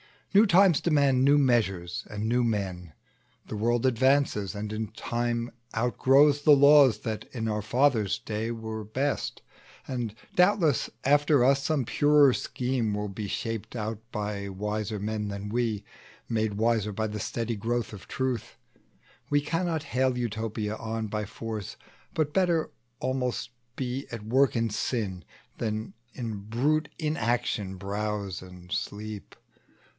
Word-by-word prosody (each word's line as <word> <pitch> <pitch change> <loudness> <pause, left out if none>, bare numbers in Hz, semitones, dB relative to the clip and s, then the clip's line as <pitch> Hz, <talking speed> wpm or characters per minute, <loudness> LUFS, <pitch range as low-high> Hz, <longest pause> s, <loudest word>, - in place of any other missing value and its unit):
New 210 +3 +7
times 185 -4 +5
demand 140 -5 +3
new 140 +2 +6
measures 105 -10 +1
and 105 0 -4
new 120 +2 +2
men; 95 -7 -2 0.6
The 110 - -4
world 120 +3 +1
advances, 130 -5 +2
and 105 +1 -4
in 110 0 -2
time 120 0 -2 0.2
outgrows 135 +5 +4
The 145 0 +7
laws 140 -5 +7
that 110 -1 -4
in 115 -3 -2
our 105 -1 -1
fathers' 115 -2 +2
day 110 +1 -3
were 110 -1 -5
best; 135 +7 -2 0.4
And, 120 -5 -3 0.2
doubtless, 180 - +3
after 145 -1 +4
us, 135 +2 +4
some 155 -4 +1
purer 145 0 +5
scheme 125 -5 -1
Will 105 0 -3
be 100 +1 -5
shaped 115 +2 -4
out 110 -1 -3
by 105 -2 -3
wiser 105 +2 -3
men 105 +1 -2
than 100 0 -5
we, 110 -2 -1 0.5
Made 110 -2 0
wiser 110 -1 +1
by 110 +2 -1
the 105 0 -5
steady 115 +2 -2
growth 115 +2 -1
of 105 -3 -10
truth. 130 -4 -2 0.7
We 145 -1 +3
cannot 165 0 -1
bring 130 0 +2
Utopia 110 -2 -3 0.3
by 105 -1 -2
force; 110 -1 -6 0.4
But 150 -2 0
better, 175 -4 +2 0.3
almost, 125 -2 -2 0.3
be 130 +1 -3
at 115 -3 -6
work 130 +4 +3
in 115 -1 0
sin; 100 -5 -2 0.3
Than 110 -2 -3 0.2
in 115 -3 -4
a - - -4
brute 135 +10 0
inaction 120 - -1
browse 100 0 -3
and 90 -1 -13
sleep. 105 -1 -5
115 Hz, 140 wpm, -28 LUFS, 105-135 Hz, 0.7 s, New